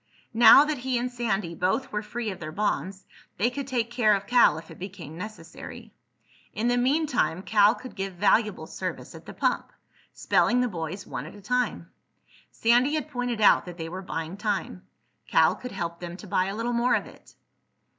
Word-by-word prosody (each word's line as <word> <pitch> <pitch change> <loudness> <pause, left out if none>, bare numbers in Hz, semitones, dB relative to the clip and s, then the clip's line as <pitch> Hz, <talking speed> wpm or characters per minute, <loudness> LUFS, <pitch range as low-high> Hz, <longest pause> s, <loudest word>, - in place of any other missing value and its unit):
Now 235 +5 +8
that 300 -3 -2
he 255 0 -1
and 245 +1 -2
Sandy 210 -8 -2
both 185 +10 -1
were 210 - -2
free 220 +1 -4
of 190 - -8
their 155 -2 -6
bonds 195 0 -2 0.3
they 240 +4 +1
could 275 +1 -5
take 240 -3 -1
care 220 -4 +3
of 200 0 -4
Cal 240 -10 +5
if 160 - -10
it - - -12
became 180 -5 -8
necessary. 180 -3 -9 0.6
In 230 +3 0
the 245 - +2
meantime, 250 - +1
Cal 205 +2 +4
could 255 - -11
give 195 -1 -4
valuable 210 +2 +2
service - - -6
at - - -13
the - - -8
pump, - - -1 0.4
spelling 245 - +2
the 250 - +2
boys 175 -1 -5
one - - -6
at - - -11
a - - -12
time. 250 +4 -1 0.6
Sandy 245 +6 +2
had 305 0 -3
pointed 245 -3 -2
out 210 - +5
that 175 -1 -9
they 165 -1 -5
were 185 +3 -6
buying 165 -1 -5
time. 200 -3 -3 0.4
Cal - - +4
could 250 - -8
help 170 -3 -4
them 175 0 -7
to 210 - -11
buy 185 -1 +1
a 195 +1 -4
little 235 +2 -2
more 240 +1 +2
of - - -1
it. - - -17
210 Hz, 195 wpm, -26 LUFS, 185-245 Hz, 0.6 s, Now